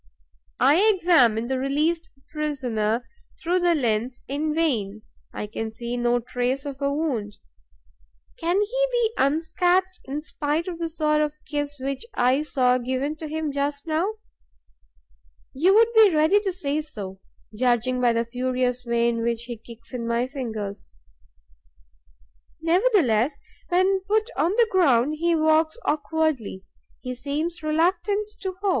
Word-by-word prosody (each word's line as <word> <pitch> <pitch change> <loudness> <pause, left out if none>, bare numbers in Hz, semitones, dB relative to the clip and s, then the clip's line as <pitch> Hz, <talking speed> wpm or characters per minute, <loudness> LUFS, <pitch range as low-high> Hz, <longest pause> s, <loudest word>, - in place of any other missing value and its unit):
I 280 +5 +5 0.2
examine 250 - +4
the 260 +1 -1
released 310 +5 0 0.2
prisoner 245 -7 -1 0.3
through 355 +2 +1
the 350 -1 +3
lens 240 -2 -1
in 295 +3 -1
vain; 215 -11 0 0.3
I - - -5
can 220 +1 -5
see 235 +2 -5
no 240 0 +1
trace 250 +3 -2
of 280 -1 -6
a 280 0 +1
wound. 255 -9 -2 1.0
Can 345 +4 0
he - - +1
be 470 -2 +1
unscathed, 355 +6 +1
in 285 +3 -4
spite 305 +2 -2
of 345 -2 -5
the 335 -1 -2
sort 305 -1 +1
of 300 0 -1
kiss 290 -1 -3
which 270 +1 -3
I 255 +3 +3
saw 255 -4 +2
given 260 +4 -2
to 315 - -6
him 310 0 -3
just 285 0 -2
now? 335 +7 0 1.4
You 355 +9 +4
would 460 +1 +5
be 440 -2 +7
ready 315 +7 +4
to 405 -2 -2
say 310 -4 -2
so, 200 -10 -8 0.4
judging 250 +1 +1
by 245 -1 +4
the 230 0 0
furious 250 +1 -1
way 235 -1 +1
in 230 -1 0
which 235 0 -1
he 240 0 -6
kicks 230 +2 -13
in 235 -2 -3
my 235 +1 +1
fingers. 220 - -6 1.6
Nevertheless, 325 - +2 0.3
when 375 +2 +3
put 435 +3 +1
on 335 - +2
the 465 +1 +4
ground, 295 -5 +3
he 340 0 +2
walks 315 +1 +2
awkwardly, 300 -10 -1 0.4
he 250 -1 -4
seems 295 +7 -3
reluctant 355 +6 +1
to 380 -2 -3
hop. 400 - +2
285 Hz, 145 wpm, -24 LUFS, 245-330 Hz, 1.6 s, be